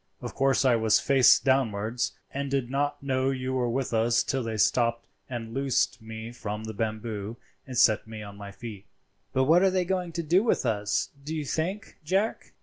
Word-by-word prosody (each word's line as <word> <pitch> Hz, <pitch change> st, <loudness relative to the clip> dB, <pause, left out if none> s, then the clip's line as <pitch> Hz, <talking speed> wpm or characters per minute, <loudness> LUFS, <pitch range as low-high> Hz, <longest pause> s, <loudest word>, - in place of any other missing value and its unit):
Of -, -, -6 dB
course 135 Hz, 0 st, +2 dB
I 125 Hz, -2 st, +5 dB
was 110 Hz, -1 st, +3 dB
face 135 Hz, -3 st, +6 dB
downwards, 120 Hz, -3 st, 0 dB, 0.2 s
and 140 Hz, 0 st, -3 dB
did 135 Hz, -3 st, -1 dB
not 145 Hz, +1 st, -1 dB
know 130 Hz, -1 st, +1 dB
you 130 Hz, -1 st, -2 dB
were 125 Hz, -2 st, 0 dB
with 125 Hz, +1 st, -2 dB
us 115 Hz, +1 st, +3 dB
till 135 Hz, -, -1 dB
they 115 Hz, -2 st, -3 dB
stopped 115 Hz, +1 st, +2 dB, 0.2 s
and 115 Hz, -3 st, -5 dB
loosed 135 Hz, -3 st, 0 dB
me 110 Hz, +1 st, -7 dB
from 105 Hz, -2 st, -5 dB
the 110 Hz, 0 st, -6 dB
bamboo 110 Hz, 0 st, -4 dB, 0.3 s
and 130 Hz, -2 st, -5 dB
set 110 Hz, -1 st, +4 dB
me 110 Hz, -1 st, -7 dB
on 100 Hz, -1 st, -9 dB
my 100 Hz, 0 st, -9 dB
feet." 105 Hz, -2 st, -9 dB, 0.4 s
"But 130 Hz, -, +2 dB
what 165 Hz, +6 st, +5 dB
are 195 Hz, -, +5 dB
they 185 Hz, -1 st, 0 dB
going 180 Hz, -1 st, -1 dB
to 170 Hz, -, -2 dB
do 175 Hz, +5 st, +4 dB
with 225 Hz, -, +1 dB
us, 105 Hz, -3 st, 0 dB
do 155 Hz, +3 st, -4 dB
you 155 Hz, -2 st, -3 dB
think, 185 Hz, +9 st, -3 dB
Jack?" 195 Hz, +8 st, -1 dB
125 Hz, 200 wpm, -27 LUFS, 110-140 Hz, 0.4 s, face